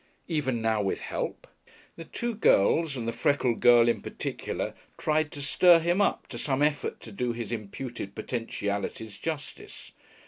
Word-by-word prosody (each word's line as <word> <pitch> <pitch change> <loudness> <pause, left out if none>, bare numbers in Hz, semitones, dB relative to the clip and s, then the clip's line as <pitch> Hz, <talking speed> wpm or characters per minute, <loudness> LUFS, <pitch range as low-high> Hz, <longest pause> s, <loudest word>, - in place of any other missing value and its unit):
Even 130 -8 -1
now 110 -1 +2
with 95 - -1
help...? - - -4 0.5
The 165 - -9
two 235 +6 -3
girls, 160 - +3
and 115 -2 -4
the - - +1
freckled 130 -5 +1
girl 120 -1 +6
in 115 -4 +1
particular, - - -4 0.2
tried 155 -1 +1
to 145 - -6
"stir 175 +4 +6
him 175 +4 +1
up" - - +1
to 120 - -6
some 135 +2 +1
effort 150 -1 0
to 110 - -10
do 120 +4 -2
his 115 -2 -5
imputed 115 -1 -6
potentialities 105 -2 -4
justice. 155 -3 -6
125 Hz, 160 wpm, -28 LUFS, 115-155 Hz, 0.5 s, girl